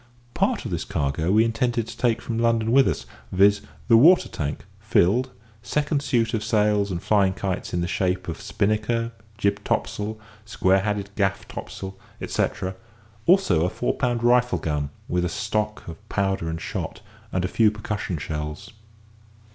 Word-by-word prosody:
Part -, -, 0 dB
of -, -, -4 dB
this -, -, -2 dB
cargo 75 Hz, +5 st, -1 dB
we 110 Hz, +3 st, +5 dB
intended 115 Hz, 0 st, 0 dB
to -, -, -8 dB
take 120 Hz, -2 st, +1 dB
from 115 Hz, -1 st, -3 dB
London 115 Hz, -1 st, +2 dB
with 135 Hz, +1 st, +6 dB
us, 85 Hz, -, -2 dB, 0.3 s
viz., 100 Hz, +2 st, +4 dB, 0.3 s
the 115 Hz, -, +7 dB
water 170 Hz, +10 st, +6 dB
tank, 75 Hz, -1 st, -4 dB
filled, 120 Hz, +9 st, +2 dB, 0.3 s
second 145 Hz, +2 st, 0 dB
suit 115 Hz, -5 st, +1 dB
of 110 Hz, -2 st, -1 dB
sails 105 Hz, -2 st, +2 dB
and 85 Hz, -2 st, -4 dB
flying 100 Hz, -3 st, +3 dB
kites 95 Hz, -1 st, -3 dB
in 90 Hz, -, -1 dB
the 85 Hz, -, -1 dB
shape 90 Hz, 0 st, -1 dB
of 85 Hz, -, -5 dB
spinnaker, 110 Hz, +2 st, 0 dB, 0.3 s
jib 100 Hz, -2 st, 0 dB
topsail, 110 Hz, +1 st, -2 dB, 0.2 s
square 95 Hz, -3 st, +2 dB
headed 100 Hz, 0 st, -2 dB
gaff 95 Hz, -2 st, 0 dB
topsail, 95 Hz, 0 st, -7 dB, 0.2 s
etcetera, 95 Hz, 0 st, -2 dB, 0.5 s
also 170 Hz, -, +4 dB
a 90 Hz, -, +2 dB
four 120 Hz, -, -1 dB
pound 120 Hz, -3 st, -1 dB
rifle 125 Hz, +1 st, +4 dB
gun, 75 Hz, -2 st, -2 dB, 0.2 s
with 90 Hz, 0 st, 0 dB
a 90 Hz, -, 0 dB
stock 105 Hz, +3 st, -2 dB
of 85 Hz, +6 st, -10 dB
powder 95 Hz, -4 st, 0 dB
and 80 Hz, 0 st, -4 dB
shot, -, -, -5 dB, 0.3 s
and 90 Hz, 0 st, 0 dB
a -, -, +1 dB
few 110 Hz, +2 st, +4 dB
percussion 105 Hz, -4 st, -4 dB
shells. 75 Hz, 0 st, -5 dB
105 Hz, 165 wpm, -24 LUFS, 90-115 Hz, 0.5 s, the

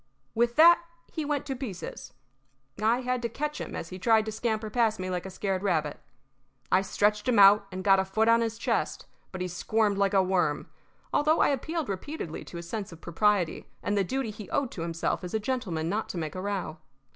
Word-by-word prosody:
With 235 Hz, +1 st, +1 dB
that 340 Hz, +2 st, +8 dB, 0.3 s
he 315 Hz, -, -3 dB
went 290 Hz, -1 st, -1 dB
to 270 Hz, -2 st, -3 dB
pieces. 235 Hz, -9 st, -7 dB, 0.7 s
I 230 Hz, +4 st, +3 dB
had 250 Hz, -1 st, -1 dB
to 235 Hz, -, -2 dB
catch 300 Hz, +5 st, -3 dB
him -, -, -6 dB
as 165 Hz, -, -5 dB
he 185 Hz, -, -8 dB
tried 220 Hz, +1 st, +3 dB
to 220 Hz, -, -3 dB
scamper 220 Hz, -1 st, -2 dB
past 225 Hz, -2 st, +2 dB
me 185 Hz, 0 st, -3 dB
like 180 Hz, +1 st, -3 dB
a -, -, -6 dB
scared 190 Hz, 0 st, -2 dB
rabbit. 160 Hz, -7 st, 0 dB, 0.7 s
I 185 Hz, -, +5 dB
stretched 210 Hz, +3 st, +1 dB
him 240 Hz, -, +3 dB
out 200 Hz, 0 st, +7 dB
and 185 Hz, 0 st, -5 dB
got 195 Hz, 0 st, +5 dB
a -, -, +2 dB
foot 215 Hz, +4 st, 0 dB
on 230 Hz, 0 st, +5 dB
his 225 Hz, -1 st, -2 dB
chest, -, -, -1 dB, 0.3 s
but 185 Hz, -, -6 dB
he 180 Hz, -, -1 dB
squirmed 200 Hz, +3 st, 0 dB
like 200 Hz, 0 st, +2 dB
a 190 Hz, -, +5 dB
worm, 180 Hz, -6 st, 0 dB, 0.5 s
although 305 Hz, +2 st, +3 dB
I -, -, +4 dB
appealed 310 Hz, +3 st, -2 dB
repeatedly 195 Hz, -, -5 dB
to 170 Hz, -, -9 dB
his 170 Hz, 0 st, -7 dB
sense 205 Hz, +1 st, -4 dB
of 165 Hz, -, -11 dB
propriety 180 Hz, 0 st, 0 dB, 0.2 s
and 205 Hz, -, 0 dB
the 200 Hz, -, +3 dB
duty 260 Hz, +3 st, -2 dB
he 210 Hz, -2 st, -10 dB
owed 275 Hz, -4 st, 0 dB
to 170 Hz, -, -6 dB
himself 165 Hz, +1 st, -2 dB
as 180 Hz, +3 st, -4 dB
a -, -, +2 dB
gentleman 205 Hz, -9 st, -2 dB
not 210 Hz, +5 st, -2 dB
to -, -, -5 dB
make 155 Hz, -3 st, -3 dB
a 185 Hz, -, -5 dB
row. 195 Hz, -5 st, -3 dB
205 Hz, 220 wpm, -28 LUFS, 185-235 Hz, 0.7 s, that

